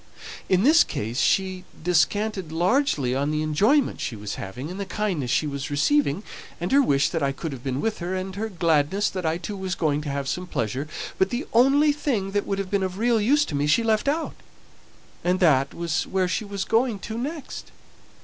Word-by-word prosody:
In 185 Hz, +1 st, +3 dB
this 315 Hz, +6 st, +7 dB
case 115 Hz, +5 st, -4 dB
she 185 Hz, -1 st, +1 dB, 0.2 s
descanted 185 Hz, +2 st, 0 dB
largely 175 Hz, -, +1 dB
on 140 Hz, +2 st, 0 dB
the 155 Hz, 0 st, 0 dB
enjoyment 210 Hz, -, +2 dB
she 120 Hz, -, -3 dB
was 105 Hz, -1 st, -5 dB
having, 125 Hz, -, -6 dB
and 190 Hz, -, -7 dB
the 200 Hz, -, -3 dB
kindness 185 Hz, -, -2 dB
she 140 Hz, -, +2 dB
was 140 Hz, -2 st, -4 dB
receiving, 160 Hz, -, +1 dB, 0.4 s
and 175 Hz, +2 st, -3 dB
her 280 Hz, -, +6 dB
wish 140 Hz, -, +2 dB
that 165 Hz, -, -2 dB
I 140 Hz, -1 st, +1 dB
could 150 Hz, +3 st, -5 dB
have 130 Hz, -3 st, -8 dB
been 135 Hz, 0 st, -2 dB
with 225 Hz, -1 st, -1 dB
her, 180 Hz, +1 st, -3 dB
and 185 Hz, 0 st, -4 dB
her 220 Hz, +2 st, -3 dB
gladness 170 Hz, +1 st, +1 dB
that 185 Hz, -3 st, -3 dB
I 160 Hz, +1 st, 0 dB
too 185 Hz, +4 st, -6 dB
was 190 Hz, -1 st, -3 dB
going 150 Hz, -2 st, 0 dB
to 150 Hz, -, -5 dB
have 140 Hz, 0 st, -3 dB
some 180 Hz, +6 st, -3 dB
pleasure; 130 Hz, -, -2 dB, 0.3 s
but 190 Hz, -, +3 dB
the 250 Hz, +5 st, -3 dB
only 275 Hz, +6 st, +5 dB
thing 230 Hz, -10 st, -1 dB
that 205 Hz, 0 st, -1 dB
would 195 Hz, -, -1 dB
have 195 Hz, -1 st, -4 dB
been 200 Hz, -1 st, +1 dB
of 185 Hz, 0 st, -3 dB
real 230 Hz, 0 st, +2 dB
use 290 Hz, +7 st, +3 dB
to -, -, -7 dB
me 145 Hz, +1 st, 0 dB
she 190 Hz, +10 st, +3 dB
left 220 Hz, +2 st, +1 dB
out, 315 Hz, +3 st, 0 dB, 0.9 s
and 180 Hz, +1 st, +1 dB
that 140 Hz, -6 st, +4 dB
was 170 Hz, -1 st, -2 dB
where 190 Hz, -1 st, 0 dB
she 200 Hz, +4 st, -2 dB
was 200 Hz, -1 st, -4 dB
going 230 Hz, -1 st, +1 dB
to 220 Hz, +4 st, -7 dB
next. 285 Hz, +6 st, -6 dB
185 Hz, 215 wpm, -24 LUFS, 150-220 Hz, 0.9 s, this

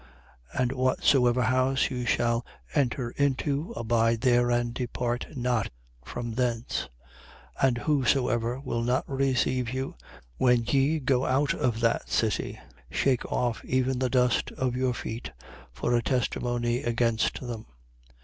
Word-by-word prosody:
9:4. -, -, -2 dB
And 125 Hz, -1 st, +1 dB
whatsoever 130 Hz, -1 st, +3 dB
house 130 Hz, +3 st, +2 dB
you 125 Hz, -2 st, -3 dB
shall 120 Hz, +1 st, +1 dB, 0.3 s
enter 130 Hz, -4 st, 0 dB
into, 140 Hz, +3 st, 0 dB
abide 115 Hz, 0 st, +1 dB
there 120 Hz, -1 st, +3 dB
and 120 Hz, 0 st, +1 dB
depart 120 Hz, -1 st, -2 dB
not 120 Hz, -3 st, 0 dB, 0.3 s
from 120 Hz, -, -5 dB
thence. 120 Hz, -, -1 dB, 0.7 s
9:5. 135 Hz, -, +6 dB
And 120 Hz, -2 st, 0 dB
whosoever 125 Hz, -3 st, +1 dB
will 115 Hz, -4 st, -2 dB
not 125 Hz, +3 st, 0 dB
receive 130 Hz, -2 st, +1 dB
you, 130 Hz, +2 st, -3 dB, 0.4 s
when 125 Hz, -2 st, +4 dB
ye 140 Hz, +5 st, +2 dB
go 130 Hz, -2 st, +1 dB
out 140 Hz, +2 st, +2 dB
of 120 Hz, -2 st, -1 dB
that 115 Hz, -1 st, +1 dB
city, -, -, 0 dB, 0.3 s
shake 130 Hz, -3 st, 0 dB
off 120 Hz, -2 st, -1 dB
even 130 Hz, 0 st, 0 dB
the 130 Hz, -1 st, +1 dB
dust 125 Hz, -2 st, +2 dB
of 125 Hz, -2 st, -1 dB
your 130 Hz, -1 st, 0 dB
feet, 110 Hz, -, -6 dB, 0.4 s
for 65 Hz, -, -1 dB
a 120 Hz, -, +3 dB
testimony 120 Hz, -1 st, 0 dB
against 115 Hz, -1 st, +1 dB
them. 120 Hz, -4 st, -6 dB
125 Hz, 140 wpm, -27 LUFS, 120-130 Hz, 0.7 s, 9:5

